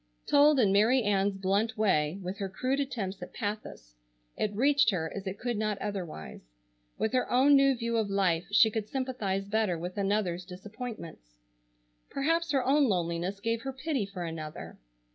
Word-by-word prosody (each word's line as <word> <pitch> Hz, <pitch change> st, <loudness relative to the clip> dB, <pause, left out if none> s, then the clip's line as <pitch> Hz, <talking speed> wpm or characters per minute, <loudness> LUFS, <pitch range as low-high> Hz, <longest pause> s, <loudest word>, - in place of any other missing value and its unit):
Told 290 Hz, 0 st, +5 dB
in 210 Hz, -5 st, +4 dB
Mary 225 Hz, +6 st, +4 dB
Ann's 200 Hz, -1 st, +1 dB
blunt 200 Hz, +4 st, 0 dB
way, 175 Hz, -6 st, +1 dB
with 185 Hz, +3 st, -5 dB
her 195 Hz, -1 st, -3 dB
crude 255 Hz, +8 st, -1 dB
attempts 215 Hz, -9 st, -3 dB
at 180 Hz, -, -9 dB
pathos, 205 Hz, -, -5 dB, 0.4 s
it 210 Hz, -, -1 dB
reached 280 Hz, +2 st, +4 dB
her 160 Hz, -6 st, -2 dB
as 195 Hz, -1 st, -6 dB
it 190 Hz, +1 st, -4 dB
could 240 Hz, 0 st, -3 dB
not 215 Hz, -1 st, -1 dB
otherwise. 180 Hz, -, -6 dB, 0.6 s
With 220 Hz, -, -1 dB
her 255 Hz, -, +1 dB
own 270 Hz, +3 st, +5 dB
new 275 Hz, -1 st, +5 dB
view 235 Hz, -1 st, -2 dB
of 220 Hz, -2 st, 0 dB
life 180 Hz, -4 st, +1 dB
she 220 Hz, +2 st, +6 dB
could 215 Hz, -1 st, -3 dB
sympathize 230 Hz, -8 st, -2 dB
better 205 Hz, -3 st, 0 dB
with 180 Hz, +4 st, -5 dB
another's 195 Hz, -3 st, 0 dB
disappointments. 185 Hz, -, -9 dB, 0.7 s
Perhaps 330 Hz, +4 st, 0 dB
her 270 Hz, -3 st, +1 dB
own 285 Hz, +2 st, +4 dB
loneliness 180 Hz, -1 st, -1 dB
gave 230 Hz, +2 st, -1 dB
her 270 Hz, -, -4 dB
pity 265 Hz, -5 st, -2 dB
for 190 Hz, -3 st, -6 dB
another. 160 Hz, -2 st, -7 dB
205 Hz, 170 wpm, -29 LUFS, 185-250 Hz, 0.7 s, she